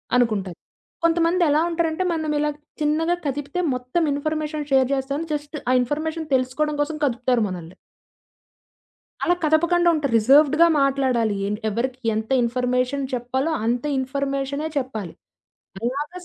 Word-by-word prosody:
అనుకుంటారు. 210 -8 +1 0.5
కొంతమందెలా 335 -2 +3
ఉంటారంటే, 335 +1 0
మనమిలా 300 -2 0 0.3
చిన్నగా 315 +3 +1
కదిపితే 285 +4 -3
మొత్తం 250 +7 -1
ఇన్‌ఫర్మేషన్ 305 0 -3
షేర్ 265 -1 +4
జేస్తామని, 275 +4 -2
జస్ట్ 295 +1 -5
ఆ - - +4
ఇన్ఫర్మేషన్ 310 +5 -3
తెలుసుకోవడం 265 +4 0
కోసం 305 +1 -2
కదుపుతారు 245 -2 +1
మనల్ని. 175 -1 -8 1.5
అలా 350 - +3
కదపకండా 340 +3 +3
ఉంటారు. 280 -5 -1
రిజర్వుడ్‌గా 290 +8 +5
మాట్లాడాలి 260 -6 +1
ఎన్ 210 +1 -2
ఎవరికీ 250 +4 -2 0.2
ఎంత 220 0 -3
ఇన్‌ఫర్మేషన్ 250 +3 0
చెప్పాలో 260 +5 -1
అంత 240 +1 0
ఇన్‌ఫర్మేషనే 275 +2 -2
చెప్పాలి. 220 -10 -4 0.7
అలాగ 275 +6 -2
280 Hz, 115 wpm, -23 LUFS, 250-310 Hz, 1.5 s, రిజర్వుడ్‌గా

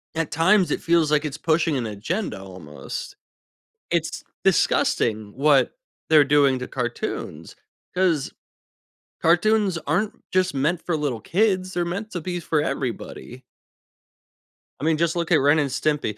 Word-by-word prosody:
at 160 -2 -2
times, 185 +4 +3
it - - -1
feels 165 -3 +2
like 150 0 +3
it's 150 0 -4
pushing 160 -2 +1
an 120 - -2
agenda 110 - -3
almost. 85 -8 -8 0.8
It's - - -1 0.2
disgusting 110 -2 +1
what 140 - +3 0.3
they're 155 -2 +7
doing 140 -2 +3
to 125 - -5
cartoons, 120 -2 -5 0.4
'cause 175 -6 +1 0.9
cartoons 195 +2 +3
aren't 185 +8 -1
just 185 -2 +1
meant 155 +6 0
for 170 -3 0
little 140 -7 -2
kids, 185 -1 +1
they're 175 0 0
meant 200 +6 -4
to 175 - -4
be 175 +2 -3
for 160 -2 0
everybody. 130 -2 -5 1.4
I - - -8
mean, 160 -1 +2
just 170 +1 +1
look 170 -1 -2
at - - +7
Ren& 145 +3 +4
Stimpy. 140 -5 -1
155 Hz, 140 wpm, -23 LUFS, 135-175 Hz, 1.4 s, they're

